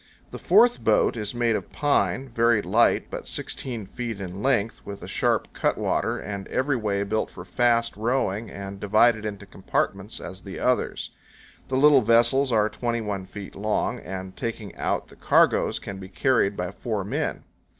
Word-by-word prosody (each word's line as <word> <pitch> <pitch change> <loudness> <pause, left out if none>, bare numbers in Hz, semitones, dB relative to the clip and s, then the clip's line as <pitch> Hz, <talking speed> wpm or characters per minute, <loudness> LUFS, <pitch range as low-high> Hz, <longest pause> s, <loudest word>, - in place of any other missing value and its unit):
The - - -7
fourth 240 0 +4
boat - - +3
is 105 0 -3
made 120 -2 +2
of - - -5
pine, 135 -4 +1
very 115 -3 +2
light, - - +2
but - - -6
16 120 -6 -4
feet 115 +1 -5
in 95 0 -6
length, 115 -4 0
with 100 -1 -8
a - - -7
sharp - - 0
cutwater, - - 0
and 100 -2 -6
every 135 +1 0
way 105 -4 -1
built 110 +2 -1
for 90 - -10
fast 115 +4 +1
rowing, 110 -1 -1
and 100 0 -7
divided 110 +2 +3
into 105 -2 -5
compartments 100 +3 -2
as 95 +1 -8
the 95 -2 -8
others. 125 0 0 0.6
The 130 - -1
little 145 -1 +6
vessels 120 +4 +3
are 110 -2 +3
21 110 -5 -3
feet 100 +1 -9
long, 105 +1 -1
and, 95 0 -7
taking 115 -2 -5
out - - -2
the - - -15
cargoes, - - +3
can 95 -1 -7
be 95 -1 -9
carried 105 -1 +1
by 90 0 -3
four 105 -1 -3
men. 140 +10 -2
110 Hz, 170 wpm, -25 LUFS, 100-120 Hz, 0.6 s, little